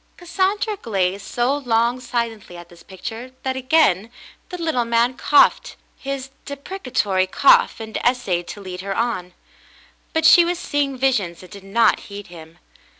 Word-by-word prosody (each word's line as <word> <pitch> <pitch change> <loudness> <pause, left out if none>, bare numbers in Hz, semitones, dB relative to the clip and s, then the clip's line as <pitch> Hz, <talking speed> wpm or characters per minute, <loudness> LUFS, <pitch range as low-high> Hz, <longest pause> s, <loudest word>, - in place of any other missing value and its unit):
Cassandra 385 +4 -1
gazed 195 -2 -1
so 245 +3 0
long 240 -1 +1
sil^^ntly 235 -6 -4
at 175 0 -11
this 170 -2 -17
picture 225 +8 -8
that 260 0 -2
again 255 - +2 0.4
the 360 - -6
little 320 -8 0
man 235 +2 +1
coughed 290 - +3 0.2
his 270 -1 -6
deprecatory 255 - -2
cough 250 +4 +4
and 220 -1 -5
essayed 200 -9 0
to 205 - -8
lead 185 -1 -7
her 195 0 -4
on; 185 -7 -2 0.8
but 320 0 0
she 345 - +8
was 350 +1 -1
seeing 285 -5 -2
visions 210 -11 0
and 185 - -14
did 200 -2 -11
not 220 +4 +2
heed 200 0 -8
him. 165 -1 -13
235 Hz, 150 wpm, -21 LUFS, 195-275 Hz, 0.8 s, she